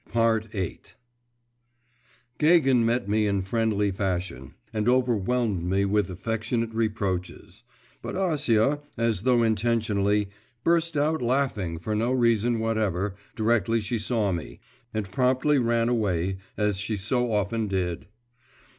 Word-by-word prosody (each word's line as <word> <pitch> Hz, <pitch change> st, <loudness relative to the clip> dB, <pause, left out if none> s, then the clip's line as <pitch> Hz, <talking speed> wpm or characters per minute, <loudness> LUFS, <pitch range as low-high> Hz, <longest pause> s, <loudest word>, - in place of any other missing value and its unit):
VIII 110 Hz, -5 st, 0 dB, 1.6 s
Gagin 150 Hz, -6 st, +4 dB
met 115 Hz, -1 st, 0 dB
me 105 Hz, +1 st, +2 dB
in 100 Hz, -2 st, 0 dB
friendly 105 Hz, 0 st, 0 dB
fashion, 90 Hz, -8 st, -3 dB, 0.2 s
and 110 Hz, +1 st, +1 dB
overwhelmed 120 Hz, -5 st, +1 dB
me 95 Hz, +3 st, +1 dB
with 100 Hz, -1 st, +1 dB
affectionate 115 Hz, +4 st, -2 dB
reproaches; 100 Hz, -3 st, -3 dB, 0.4 s
but -, -, -5 dB
Acia, 145 Hz, -, +1 dB, 0.2 s
as 115 Hz, -5 st, 0 dB
though 120 Hz, 0 st, +3 dB
intentionally, 105 Hz, -2 st, +1 dB, 0.4 s
burst 165 Hz, -2 st, +2 dB
out 150 Hz, +1 st, +1 dB
laughing 120 Hz, -9 st, 0 dB
for 105 Hz, +6 st, -4 dB
no 115 Hz, +4 st, 0 dB
reason 120 Hz, -2 st, +2 dB
whatever, 105 Hz, -4 st, -1 dB, 0.2 s
directly 115 Hz, 0 st, +1 dB
she 110 Hz, +2 st, -2 dB
saw 105 Hz, -2 st, 0 dB
me, 85 Hz, -3 st, -5 dB, 0.3 s
and 105 Hz, -4 st, -4 dB
promptly 130 Hz, +6 st, +2 dB
ran 115 Hz, -1 st, +1 dB
away, 95 Hz, -6 st, 0 dB, 0.2 s
as 105 Hz, -2 st, +1 dB
she 105 Hz, +2 st, -2 dB
so 120 Hz, +4 st, 0 dB
often 105 Hz, +2 st, 0 dB
did. 90 Hz, -3 st, -2 dB
110 Hz, 120 wpm, -26 LUFS, 100-120 Hz, 1.6 s, Gagin